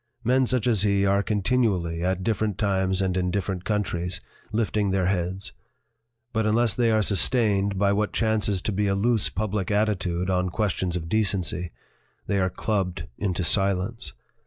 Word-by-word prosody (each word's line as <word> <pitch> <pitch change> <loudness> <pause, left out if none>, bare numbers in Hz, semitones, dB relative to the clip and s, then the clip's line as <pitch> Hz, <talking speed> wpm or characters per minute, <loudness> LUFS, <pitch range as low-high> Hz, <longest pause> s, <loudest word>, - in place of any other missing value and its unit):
Men 130 +2 +3
such 125 -2 0
as 115 -6 +2
he 100 -1 +2
are 100 0 +3
continually, 100 -6 0
at 95 0 0
different 110 -2 0
times 95 -2 +1
and 95 -1 0
in 90 -1 0
different 95 -1 -2
countries, 90 -4 -1 0.3
lifting 105 -2 0
their 95 -1 +1
heads. 95 +1 -1 0.8
But 110 -1 +1
unless 115 0 +2
they 115 +1 +2
are 110 -1 +3
sustained 100 -2 +2
by 100 +1 +3
what 105 +1 0
chances 105 -4 0
to - - -1
be 105 +1 0
a 100 - +1
loose 110 +2 +1
public 105 -2 -2
attitude 95 -4 0
on 90 -1 +1
questions 95 -3 -1
of 80 -2 -3
decency, 95 -3 0 0.6
they 100 - 0
are 95 0 +2
clubbed 95 -3 -2
into 95 -3 -1
silence. 100 +5 +1
100 Hz, 160 wpm, -25 LUFS, 95-110 Hz, 0.8 s, Men